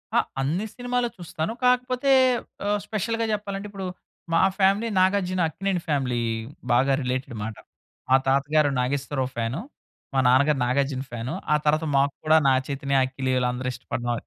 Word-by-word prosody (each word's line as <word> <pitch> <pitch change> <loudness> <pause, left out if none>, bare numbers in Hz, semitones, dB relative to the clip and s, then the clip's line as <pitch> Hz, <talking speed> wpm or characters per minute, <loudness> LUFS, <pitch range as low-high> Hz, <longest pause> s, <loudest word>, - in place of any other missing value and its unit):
ఆ! - - +6 0.2
అన్ని 165 +10 -1
సినిమాలు 245 0 -1
చూస్తాను. 170 +3 -4
కాకపోతే 250 +2 +2 0.6
ఆహ్, 205 0 +1
స్పెషల్‌గా 225 +2 -1
చెప్పాలంటే 205 -1 -4
ఇప్పుడు 195 -2 -5 0.5
మా 165 - +4 0.2
ఫ్యామిలీ 195 +4 +3
నాగార్జున 185 -1 +2
అక్కినేని 190 +1 -2
ఫ్యామిలీ 130 -5 0 0.5
బాగా 135 +3 +4
రిలేటెడ్ 130 0 -3
మాట. 110 0 -5 0.5
మా 130 - +6
తాతగారు 145 +2 +3
నాగేశ్వరరావు 135 0 -1
ఫ్యాను. 115 +3 -2 0.5
మా 135 - +2
నాన్నగారు 140 +3 +4
నాగార్జున 135 +1 0
ఫ్యాను. 120 +4 -4 0.2
ఆ - - +6
తరువాత 155 +2 +2
మాకు 140 +1 +2
కూడా 155 +1 +6
నాగ 130 -1 +4
చైతన్య, 140 -1 +1
అఖిల్ 130 0 -4
వీళ్ళందరు 125 0 0
ఇష్టపడడం. 120 0 -3
145 Hz, 145 wpm, -25 LUFS, 130-195 Hz, 0.6 s, ఆ